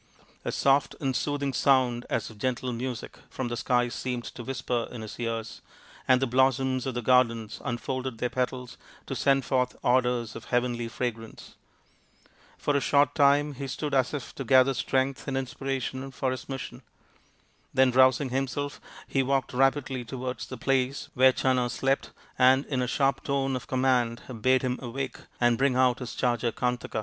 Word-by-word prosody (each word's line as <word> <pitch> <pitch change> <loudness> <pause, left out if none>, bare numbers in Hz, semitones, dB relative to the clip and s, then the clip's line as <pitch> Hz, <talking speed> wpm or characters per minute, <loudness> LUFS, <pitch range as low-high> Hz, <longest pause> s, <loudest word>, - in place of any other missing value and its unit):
A - - -2
soft 140 0 +2
and 135 -3 -1
soothing 145 -1 -1
sound 125 -2 +2
as - - -2
of 105 - -15
gentle 130 +1 -1
music 120 0 -5
from 130 -2 -4
the 120 - -2
skies 120 -1 +1
seemed 125 -2 -3
to 120 - -8
whisper 125 -2 -2
in 120 -3 -7
his 110 - -9
ears, 115 -1 -4 0.5
and 130 -1 +5
the 135 - +1
blossoms 130 +1 +2
of 130 - -3
the 120 - -2
garden 115 -3 +3
unfolded 130 0 -3
their 125 +2 -2
petals 125 -1 -3 0.3
to - - -4
send 135 -2 +2
forth 125 -1 0
odours 125 -2 +1
of - - -8
heavenly 120 -1 0
fragrance. 115 -1 -5 1.0
For 145 - 0
a 140 - +2
short 145 +1 +3
time 145 0 +4
he 135 +1 -6
stood 145 +2 -4
as 130 -2 +2
if 145 -4 -5
to 135 - -5
gather 130 +2 +5
strength 135 +2 -1
and 135 -1 -1
inspiration 135 0 -3
for 130 0 -2
his 130 - -6
mission. 130 -2 -6 0.9
Then, 130 -1 +4
rousing 130 +1 +4
him 135 +2 0
self, 145 +2 -4 0.3
he 135 - +1
walked 135 -1 0
rapidly 135 0 +1
towards 125 +1 -5
the 130 - -7
place 135 +2 0
where 130 +1 +6
Channa 130 -1 +1
slept 135 +3 0 0.3
and 130 +2 +5
in 130 -3 -1
a 125 - 0
sharp 135 +2 +1
tone 135 -1 0
of 130 - -6
command 125 -3 +1 0.2
bade 130 +2 +3
him 125 0 -1
awake 130 +2 -4 0.2
and 120 -1 +3
bring 135 -1 +3
out 130 -1 +3
his 125 -2 -6
charger 120 -2 0
Kantaka. 125 -1 -2
130 Hz, 175 wpm, -27 LUFS, 120-135 Hz, 1.0 s, where